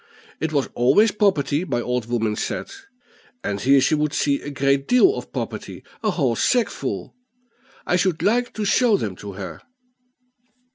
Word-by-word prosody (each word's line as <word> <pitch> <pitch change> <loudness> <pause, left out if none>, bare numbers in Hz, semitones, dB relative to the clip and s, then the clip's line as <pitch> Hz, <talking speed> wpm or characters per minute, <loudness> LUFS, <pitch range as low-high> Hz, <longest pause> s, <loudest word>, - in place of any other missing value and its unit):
It 160 0 -2
was 140 -3 0
always 205 - +4
property, 165 -7 +1
my 135 -9 -2
old 125 -1 -2
woman 110 -3 -1
said; - - -4 0.7
and 100 0 -3
here 135 +2 +5
she 135 - +2
would 150 0 0
see 140 -1 +1
a - - -6
great 140 0 0
deal 310 +11 +5
of - - -7
property - - -6 0.2
a 215 - +1
whole 140 - 0
sackful; 245 - -1 0.7
I 180 - +2
should 175 -3 0
like 240 +5 +2
to 215 - -2
show 225 +1 +3
them 105 - -4
to 100 -1 -8
her." 95 -4 -8
145 Hz, 160 wpm, -22 LUFS, 120-200 Hz, 0.7 s, here